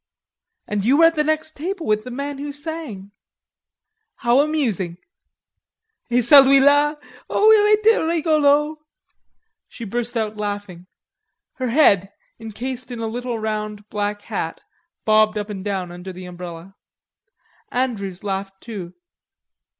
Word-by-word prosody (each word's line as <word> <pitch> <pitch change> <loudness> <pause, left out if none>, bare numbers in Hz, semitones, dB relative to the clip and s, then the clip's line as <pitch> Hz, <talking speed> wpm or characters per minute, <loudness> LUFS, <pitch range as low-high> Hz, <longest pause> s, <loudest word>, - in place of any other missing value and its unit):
"And 205 -1 -2
you 260 +6 +4
were 330 - +7
at 330 0 +4
the 300 - +2
next 310 0 -1
table 350 +3 -4
with 215 0 +1
the - - -6
man 280 +2 -5
who 290 +1 -5
sang?" 285 -10 -6 1.0
"How 240 +1 +2
amusing!" 240 - 0 1.1
"Et 245 +1 +3
celui 275 +2 +8
la! 290 +2 +4 0.3
O 435 +1 +5
il 425 -1 +6
etait 435 -1 +3
rigolo...." 305 -2 +2 0.9
She 235 - -9
burst 240 +3 -3
out 215 -1 -2
laughing; 205 -4 -5 0.7
her 255 - -2
head, 200 -8 +4 0.3
encased 240 +4 -6
in 245 - -6
a 225 - -3
little 240 +1 -3
round 215 -1 -4
black 205 0 -3
hat, - - -4 0.5
bobbed 215 0 +4
up 210 0 -4
and 195 -2 -6
down 190 -3 -3
under 180 +2 -8
the 185 0 -10
umbrella. 175 0 -9 1.0
Andrews 210 -8 -2
laughed 195 -1 -4
too. 195 -7 -8
230 Hz, 135 wpm, -21 LUFS, 205-290 Hz, 1.1 s, celui